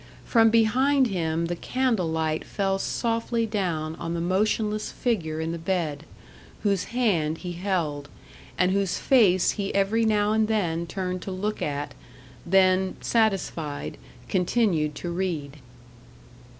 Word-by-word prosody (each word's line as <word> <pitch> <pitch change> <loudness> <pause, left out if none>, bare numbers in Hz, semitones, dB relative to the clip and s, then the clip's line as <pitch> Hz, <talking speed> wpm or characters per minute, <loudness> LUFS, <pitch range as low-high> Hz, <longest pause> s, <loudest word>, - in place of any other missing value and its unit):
From 225 -2 +5
behind 255 +4 +3
him 165 -3 -1
the 175 +1 -2
candle 240 -3 0
light 160 -1 -1
fell 195 -1 -1
softly 230 +1 -1
down 170 -7 -2
on 165 +1 -4
the - - -2
motionless 210 +4 0
figure 170 -11 -1
in 160 +1 -2
the 170 - -4
bed, 160 -4 -2 0.6
whose 200 -3 +1
hand 185 -11 0
he 180 +1 -6
held, 170 -6 -2 0.5
and 180 0 +3
whose 195 -1 0
face 195 -9 +4
he 200 -2 -3
every 200 +3 +2
now 210 -1 +2
and 220 0 +2
then 170 -6 0
turned 185 0 -3
to 195 - -6
look 205 +3 -3
at 145 0 -3 0.5
then, 185 0 +3
satisfied, 195 -9 -1 0.3
continued 180 - +1
to 175 - -5
read. 165 -6 -3
190 Hz, 135 wpm, -25 LUFS, 165-215 Hz, 0.6 s, From